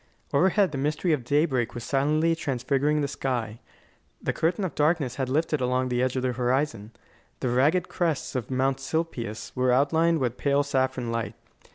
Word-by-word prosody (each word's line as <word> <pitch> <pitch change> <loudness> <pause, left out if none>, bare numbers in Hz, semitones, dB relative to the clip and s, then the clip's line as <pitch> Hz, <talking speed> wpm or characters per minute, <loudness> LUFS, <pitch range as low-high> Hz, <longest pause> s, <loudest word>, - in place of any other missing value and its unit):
Overhead 190 +4 +3
the 140 - -4
mystery 150 +4 0
of 140 -5 -1
daybreak 135 -3 +1
was 120 - -5
silently 155 +5 +2
transfiguring 145 0 0
the 140 - 0
sky. 120 -5 -3 0.6
The - - -2
curtain 170 +5 0
of 170 - -4
darkness 150 -4 +1
had 130 -2 -1
lifted 150 +1 0
along 125 0 +1
the 125 0 0
edge 130 0 0
of 130 - -1
the 130 - +1
horizon. 125 -3 -1 0.5
The 130 - -1
ragged 145 +9 +2
crests 165 -5 -1
of 125 -5 -3
Mount 130 +1 +1
Silpius 135 -7 -4
were 125 -1 +2
outlined 160 +6 +3
with 125 -4 -1
pale 140 0 +2
saffron 130 -3 -1
light. 115 -1 -3
135 Hz, 175 wpm, -26 LUFS, 125-150 Hz, 0.6 s, Overhead